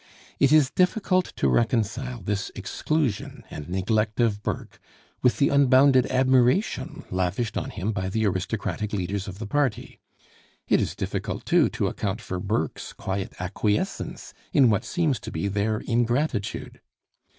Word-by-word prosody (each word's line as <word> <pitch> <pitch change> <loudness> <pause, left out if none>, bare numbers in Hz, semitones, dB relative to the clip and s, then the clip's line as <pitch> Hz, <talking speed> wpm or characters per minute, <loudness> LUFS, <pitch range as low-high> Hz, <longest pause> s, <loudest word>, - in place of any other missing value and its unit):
It 140 - +4
is 150 -3 +5
difficult 185 0 +2
to - - +1
reconcile 115 - 0
this 100 0 -2
exclusion 150 -10 -2
and 75 +2 -7
neglect 105 +4 0
of 110 -4 +2
Burke - - -5 0.4
with 125 - +3
the 140 - +3
unbounded 135 -1 +5
admiration 130 - +2
lavished 95 +5 -1
on - - -2
him 105 +2 -3
by 95 -3 -2
the 110 +3 0
aristocratic 105 +2 -2
leaders 100 +1 -2
of 95 -1 -7
the 110 - -5
party. 130 0 -1 0.7
It - - +4
is - - -2
difficult - - -4
too - - +4
to - - -2
account 105 +1 -2
for 95 -4 -5
Burke's 95 -5 -2
quiet 95 0 -4
acquiescence 105 +3 -2 0.2
in 130 -5 +5
what 100 - 0
seems 160 - 0
to - - -8
be 80 +5 -2
their 105 +2 0
ingratitude. 120 -1 -1
110 Hz, 145 wpm, -25 LUFS, 100-130 Hz, 0.7 s, is